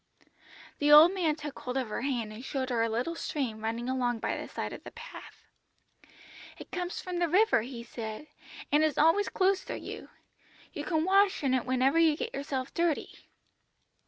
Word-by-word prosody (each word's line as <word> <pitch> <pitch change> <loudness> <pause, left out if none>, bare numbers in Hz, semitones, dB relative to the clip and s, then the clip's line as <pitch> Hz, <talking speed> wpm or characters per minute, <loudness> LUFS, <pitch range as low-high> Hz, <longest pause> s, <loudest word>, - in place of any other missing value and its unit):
"The 295 0 +3
old 310 +5 +9
man 335 -6 +1
took 300 -2 -7
hold 250 +1 -4
of 255 -4 -2
her 210 - -3
hand 240 -5 -2
and 225 +3 -9
showed 265 -1 -3
her 235 -2 +1
a 230 - +1
little 240 +9 -1
stream 255 -9 -4
running 230 +2 -2
along 250 -2 0
by - - -2
the - - -6
side - - -5
of - - -9
the - - -8
path. 480 +1 -12 1.1
"'It - - -12
comes 360 -1 -3
from 360 -1 -4
the 345 -1 +1
river,' 400 - +4
he 235 0 -7
said, 220 +2 -7 0.5
'and 295 +2 +4
is 310 -2 +1
always 330 +7 +4
close 385 0 +1
to - - -4
you. - - -8 0.6
You - - -5
can 320 -3 0
wash 390 -2 +3
in 265 -2 +2
it 255 -1 0
whenever 260 +5 +2
you 320 -2 +4
get - - -4
yourself 275 -1 -4
dirty.' 335 -3 -2
285 Hz, 190 wpm, -29 LUFS, 245-335 Hz, 1.1 s, old